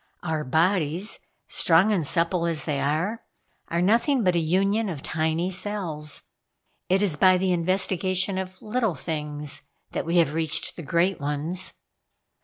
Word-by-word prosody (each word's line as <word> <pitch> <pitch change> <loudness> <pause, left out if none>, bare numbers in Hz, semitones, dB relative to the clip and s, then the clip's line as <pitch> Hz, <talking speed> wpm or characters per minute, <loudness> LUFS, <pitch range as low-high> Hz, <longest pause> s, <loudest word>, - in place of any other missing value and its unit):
Our 160 -3 -1
bodies, 165 +5 +1 0.3
strong 180 +4 +3
and 175 -8 +1
supple 170 +1 +1
as 165 -3 -2
they 145 -3 -1
are, 160 +11 -1 0.4
are 170 +1 0
nothing 235 +6 +3
but 180 -2 +3
a - - +3
union 195 +6 +1
of 150 -6 -6
tiny 160 +3 0
cells. 175 -6 -2 0.7
It 190 +2 +3
is 185 -7 +1
by 185 +4 +5
the 185 0 +1
investigation 185 +2 +1
of 185 0 -6
little 220 -4 0
things 150 -1 -4 0.3
that - - -3
we 170 +1 +1
have 160 -4 +3
reached 160 -1 -1
the - - -7
great 170 +5 +1
ones." 150 +6 0
175 Hz, 150 wpm, -25 LUFS, 155-190 Hz, 0.7 s, by